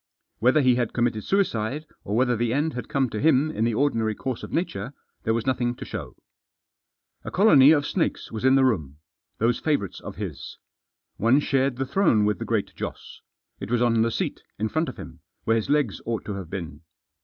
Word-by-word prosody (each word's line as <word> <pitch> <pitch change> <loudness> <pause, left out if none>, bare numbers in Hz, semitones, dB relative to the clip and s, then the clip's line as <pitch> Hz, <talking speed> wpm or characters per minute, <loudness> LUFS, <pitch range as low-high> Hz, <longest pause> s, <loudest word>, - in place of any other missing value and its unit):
Whether 130 +7 +4
he 125 -2 +4
had 120 -3 -1
committed 120 -3 0
suicide, 150 - 0 0.2
or 100 - -3
whether 125 +1 +2
the 115 +1 0
end 155 +3 0
had 125 - -6
come 135 -2 +1
to 105 - -3
him 150 +1 +3
in 110 -6 -1
the 115 -2 0
ordinary 115 -5 +1
course 130 +1 -4
of - - -8
nature, 135 - -2 0.3
there 110 - +2
was 115 - -2
nothing 120 -2 0
to - - -8
show. - - -7 1.1
A - - -5
colony 150 -9 +6
of 150 -2 +4
snakes 175 - -2
was 110 0 -5
in 130 +1 +5
the 135 -1 +5
room. 80 - -1 0.4
Those 120 +2 +1
favourites 145 - -1
of - - -8
his. - - -7 0.6
One 120 +6 +4
shared 135 -2 +1
the 135 +2 -2
throne 130 - +3
with 105 -3 0
the - - -4
Great - - -1
Joss. - - -7 0.4
It 100 - -6
was 120 0 +2
on 115 -2 +3
the 115 - +2
seat, - - -3 0.2
in 110 +1 -1
front 160 +5 0
of - - -9
him, - - -10 0.2
where 115 - +2
his 110 - -1
legs 145 -8 +1
ought 115 -1 -3
to 105 - -4
have 95 -4 -7
been. 85 -5 -6
120 Hz, 210 wpm, -25 LUFS, 110-140 Hz, 1.1 s, colony